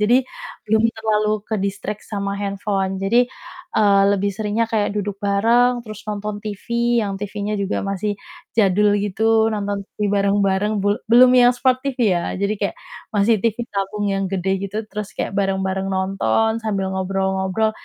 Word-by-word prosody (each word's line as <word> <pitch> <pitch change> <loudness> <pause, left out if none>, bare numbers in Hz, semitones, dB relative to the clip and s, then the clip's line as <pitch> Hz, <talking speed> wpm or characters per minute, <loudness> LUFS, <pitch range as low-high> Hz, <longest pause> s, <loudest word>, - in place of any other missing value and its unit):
Jadi 210 +4 +4 0.5
belum 220 +1 +2
terlalu 215 -1 0 0.2
ke-distract 205 0 -3
sama 200 -1 -2
handphone. 195 -1 -2
Jadi, 220 +5 +3 0.6
eee, 200 -2 +5
lebih 200 0 +1
seringnya 215 +2 -1
kayak 215 -3 +1
duduk 205 -1 -3
bareng 230 +5 +3
terus 215 -1 -8
nonton 210 0 -3
TV, 210 -2 -7 0.4
yang 200 -2 -3
TV-nya 205 +1 -3
juga 195 - -1
masih 200 +2 -1 0.5
jadul 205 0 +4
gitu 205 +1 -3 0.3
nonton 205 -1 -2 0.2
TV - - -61 0.2
bareng-bareng 200 +1 +2
bul 205 +2 +1
belum 250 +2 +8
yang 245 - +6
Smart 255 0 +2
TV, 275 -2 -3 0.2
ya. 175 - 0
Jadi 200 +2 -1
kayak 200 - -1 0.4
masih 210 +2 +4
TV 230 -3 +2 0.2
tabung 200 +1 -2
yang 195 0 0
gede 190 -1 -1 0.2
gitu 200 +2 -8
terus 210 -1 -5
kayak - - -2
bareng-bareng 190 -1 -1
nonton 195 - +1
sambil 195 -3 -1
ngobrol-ngobrol. 190 +2 0
205 Hz, 150 wpm, -21 LUFS, 195-215 Hz, 0.6 s, belum